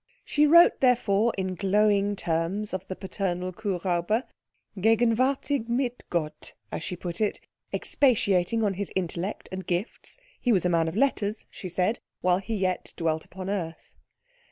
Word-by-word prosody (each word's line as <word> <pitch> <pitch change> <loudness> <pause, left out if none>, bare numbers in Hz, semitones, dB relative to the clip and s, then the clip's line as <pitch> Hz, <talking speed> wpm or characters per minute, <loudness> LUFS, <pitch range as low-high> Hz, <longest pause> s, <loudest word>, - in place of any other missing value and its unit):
She 300 0 +3
wrote 340 +3 +7
therefore 230 -4 +3
in 190 -1 -1
glowing 205 +1 +2
terms 175 +4 -1
of 190 0 -4
the 185 - -4
paternal 185 -1 -3
Kuhräuber, 190 +2 -1 0.5
"gegenwärtig 230 +5 +2
mit 245 0 -1
Gott," 155 -3 -3 0.2
as - - -4
she 180 - -4
put 175 +1 -5
it, 210 - 0 0.3
expatiating 225 -5 +2
on 205 -2 +2
his 200 +1 -3
intellect 185 +2 -2
and 190 0 -5
gifts 180 - -3 0.2
(he 245 - +1
was 185 -5 +3
a - - +3
man 165 -1 +2
of 160 - -4
letters, 220 -5 0
she 185 - -7
said), 185 +6 0 0.2
while 180 0 +3
he 220 +3 -4
yet 185 -2 -1
dwelt 160 -2 -1
upon 185 0 -8
earth. 170 -5 -4
195 Hz, 155 wpm, -27 LUFS, 180-225 Hz, 0.5 s, wrote